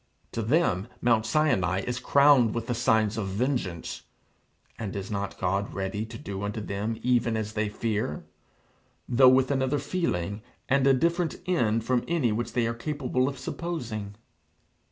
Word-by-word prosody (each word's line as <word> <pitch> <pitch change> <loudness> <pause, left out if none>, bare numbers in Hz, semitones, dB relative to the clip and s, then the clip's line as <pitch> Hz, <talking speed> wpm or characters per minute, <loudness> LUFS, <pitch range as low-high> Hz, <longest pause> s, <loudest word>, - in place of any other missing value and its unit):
To 115 - -2
them 115 - +1
Mount 115 -2 +2
Sinai 95 - +2
is 120 +4 -3
crowned 140 -4 +5
with 115 -1 -2
the 120 - -1
signs 110 -2 +2
of 100 - -2
vengeance. 100 - -2 0.8
And 105 -4 -4
is 100 +1 -5
not 100 -1 -3
God 95 +2 -1
ready 100 +3 -3
to - - -8
do 100 -9 -6
unto 100 +1 -3
them 105 +2 -3
even 120 -2 +2
as 110 0 -3
they 110 -1 -1
fear, 105 -7 -2 0.8
though 130 +1 +6
with 130 +1 +4
another 135 +1 +1
feeling 110 - -2 0.3
and 140 0 +3
a 135 - +6
different 170 +4 +1
end 115 -11 +1
from 125 0 +1
any 160 -9 +1
which 115 +1 -2
they 120 -1 +1
are 115 - -1
capable 130 0 -1
of 140 - -7
supposing? 120 -11 -5
115 Hz, 160 wpm, -27 LUFS, 105-130 Hz, 0.8 s, though